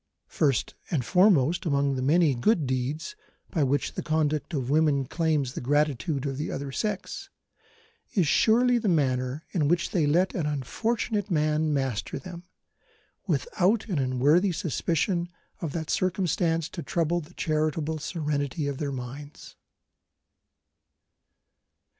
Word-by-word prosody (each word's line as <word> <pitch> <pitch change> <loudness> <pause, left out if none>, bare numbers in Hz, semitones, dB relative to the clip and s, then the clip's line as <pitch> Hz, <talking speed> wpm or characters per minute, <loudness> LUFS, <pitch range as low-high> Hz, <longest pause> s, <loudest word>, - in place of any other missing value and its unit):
First 135 -6 +1 0.2
and 140 -8 -1
foremost 180 - +4
among 140 -4 +1
the 130 - -2
many 155 +2 +4
good 155 - +2
deeds 130 - -2 0.4
by 165 - 0
which 140 +1 0
the - - -4
conduct 155 +1 0
of 135 -5 -2
women 150 -3 +3
claims 150 -4 0
the - - -5
gratitude 145 0 0
of 135 -1 -3
the 150 - -3
other 140 0 -4
sex, 210 - -3 0.9
is 180 -7 +3
surely 240 - +4
the 220 - -2
manner 130 -2 0
in 155 -6 +1
which 175 +3 +1
they 160 -5 +2
let 175 +6 +2
an 160 -5 -1
unfortunate 205 - -1
man 155 -2 +1
master 135 -6 -1
them, 175 +5 -9 0.8
without 215 - +1
an 175 -7 0
unworthy 140 +9 +3
suspicion 170 0 -1 0.3
of 165 -4 -3
that 160 -2 -3
circumstance 175 -3 0
to 170 - -6
trouble 170 +1 0
the 170 +3 -15
charitable 155 0 -1
serenity 150 -3 -2
of 140 -2 -3
their 145 -2 -2
minds. 135 +3 -8
155 Hz, 135 wpm, -27 LUFS, 140-175 Hz, 0.9 s, foremost